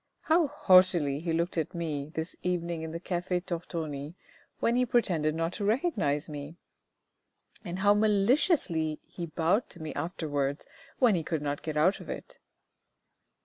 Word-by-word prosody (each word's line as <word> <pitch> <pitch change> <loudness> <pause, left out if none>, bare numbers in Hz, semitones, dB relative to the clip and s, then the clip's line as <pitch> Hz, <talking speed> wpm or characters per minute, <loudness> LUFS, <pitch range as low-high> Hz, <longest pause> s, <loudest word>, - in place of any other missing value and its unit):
How 320 0 +3
haughtily 185 - +4
he 165 +1 -3
looked 170 +1 0
at 160 - -3
me 150 -4 -3
this 160 +2 -4
evening 170 -2 -2
in 160 - -4
the 165 +1 -5
Cafe 180 0 -2
Tortoni 165 -4 -5 0.4
when 235 - +2
he 250 - +3
pretended 175 -11 +1
not 165 +2 -1
to 205 - -4
recognise 200 - +1
me! 150 +1 -7 1.1
And 175 +1 -5
how 205 +1 +5
maliciously 205 - +2
he 170 -2 -7
bowed 170 +8 +1
to 175 - -8
me 155 -1 -5
afterwards, 145 -3 -2 0.3
when 245 -5 +5
he 175 - +1
could 160 -1 -3
not 145 0 -2
get 155 -1 -4
out 175 +6 +3
of - - -11
it." - - -7
170 Hz, 155 wpm, -29 LUFS, 155-195 Hz, 1.1 s, how